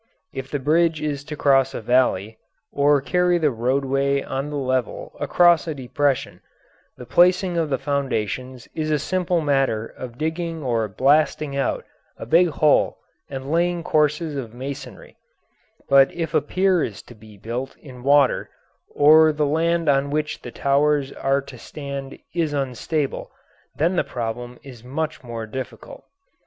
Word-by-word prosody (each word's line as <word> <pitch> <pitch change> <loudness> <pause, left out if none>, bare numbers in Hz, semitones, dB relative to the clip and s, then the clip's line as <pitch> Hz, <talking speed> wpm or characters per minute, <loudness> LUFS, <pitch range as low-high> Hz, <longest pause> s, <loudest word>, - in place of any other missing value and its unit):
If 135 0 -6
the 145 - -1
bridge 160 +3 +2
is 145 -2 -3
to 150 - -6
cross 135 -2 +3
a - - -3
valley, 110 -3 +1 0.3
or 145 0 +3
carry 180 +4 +2
the 155 -4 +2
roadway 135 +3 0
on 135 +2 -4
the 150 - -5
level 130 -3 -2
across 175 -1 +4
a 160 - -3
depression, 135 +1 -1 0.6
the 125 - -9
placing 180 +4 +3
of 165 -2 0
the 135 - 0
foundations 130 -3 -3
is 155 -1 -2
a 150 - +2
simple 180 +2 0
matter 135 -7 +1
of 120 0 -10
digging 160 +1 -3
or 115 -4 0
blasting 140 +6 +2
out 140 - -1 0.3
a - - -7
big 170 +9 +4
hole 150 -1 +2 0.3
and 135 +1 -6
laying 170 +1 +1
courses 150 0 +1
of 120 -4 -6
masonry; 135 +2 -8 0.7
but 135 0 +6
if 165 -2 -3
a - - +3
pier 185 +3 +1
is 100 -3 -5
to - - -14
be 110 -2 -16
built 120 +6 -5
in 130 -4 -13
water, 140 +1 +3 0.5
or 155 +2 +7
the 150 0 0
land 165 +3 +1
on 140 0 +2
which 150 +1 -2
the - - -8
towers 140 0 +1
are 135 +1 0
to 130 -3 -12
stand 140 -1 -7 0.2
is 165 -4 -1
unstable, 140 +2 -2 0.5
then 170 +5 +1
the - - +3
problem 120 +1 -5
is 125 -4 -12
much 150 +5 -4
more 115 -2 -6
difficult. 130 +4 -8
140 Hz, 155 wpm, -22 LUFS, 130-155 Hz, 0.7 s, or